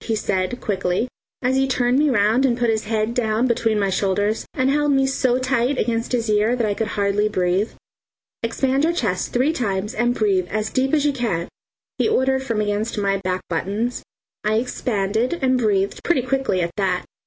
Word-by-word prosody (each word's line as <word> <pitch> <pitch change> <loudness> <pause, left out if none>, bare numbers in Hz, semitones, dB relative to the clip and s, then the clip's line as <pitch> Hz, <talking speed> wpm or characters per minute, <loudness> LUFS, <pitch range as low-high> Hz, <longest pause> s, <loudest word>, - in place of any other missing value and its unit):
he 225 - -1
said 190 +3 -1
quickly, 190 +2 -1 0.4
and 250 +1 +2
he 270 0 +2
turned 255 0 +2
me 300 0 +3
round 225 +1 +3
and 245 -3 +2
put 240 -2 +2
his 220 -1 -1
head 220 +1 -1
down 225 -1 +1
between 225 -3 +1
my 200 -1 +1
shoulders 205 +3 0
and 260 +1 +2
held 295 0 +2
me 270 -1 +3
so 260 -2 +1
tight 255 +1 0
against 230 -1 -1
his 235 -2 0
ear 215 +3 +2
that 240 -2 0
I 205 - 0
could 220 +2 -2
hardly 205 0 0
breathe. 185 +2 0 0.7
"Expand 265 +4 0
your 335 +2 +2
chest 200 - -1
three 260 +6 +2
times 210 -5 -2
and 240 +1 +1
breathe 195 -5 +1
as 215 +2 -2
deep 265 +3 +1
as 295 -1 +1
you 290 - +2
can," 215 -10 -2 0.5
he - - +2
ordered 265 -9 +2
from 230 -5 -1
against 210 +2 -2
my 200 -1 +1
back 185 -1 -2
buttons. 205 +8 -2 0.4
I 215 +1 +1
expanded 225 - -1
and 260 -2 +2
breathed 200 -4 0
pretty 310 -8 +2
quickly 260 -7 0
at 170 0 -1
that. 185 -3 0
225 Hz, 195 wpm, -21 LUFS, 205-255 Hz, 0.7 s, me